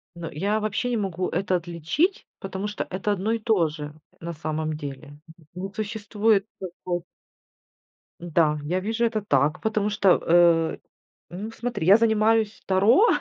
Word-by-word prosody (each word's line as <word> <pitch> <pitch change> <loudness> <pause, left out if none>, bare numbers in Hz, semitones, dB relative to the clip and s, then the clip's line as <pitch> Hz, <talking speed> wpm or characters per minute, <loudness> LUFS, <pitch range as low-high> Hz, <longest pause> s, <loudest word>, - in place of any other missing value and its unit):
Ну, 170 -1 -6
я 200 +8 0
вообще 215 +4 -1
не 235 - +1
могу 185 -3 -2
это 190 -1 0
отличить, 175 - -1
потому 195 +1 -4
что 210 - -4
это 195 +3 -2
одно 205 +3 -1
и 230 - 0
то 210 -7 +2
же. 150 -1 -7 0.3
На 170 +1 -5
самом 155 0 -3
деле, 145 0 -8 0.3
не 185 +2 -5
существует 210 -1 0
такое. 175 -1 -5 1.2
Да, 160 -3 +1
я 175 +5 -1
вижу 225 +4 0
это 225 -2 0
так, 145 -5 +1
потому 215 -1 0
что, 200 -3 +3
э, 170 -1 +4 0.5
ну, 200 +6 -6
смотри: 235 -6 -4
я 200 +3 +8
занимаюсь 220 -1 +2
Таро, 220 - +5
195 Hz, 150 wpm, -25 LUFS, 170-215 Hz, 1.2 s, я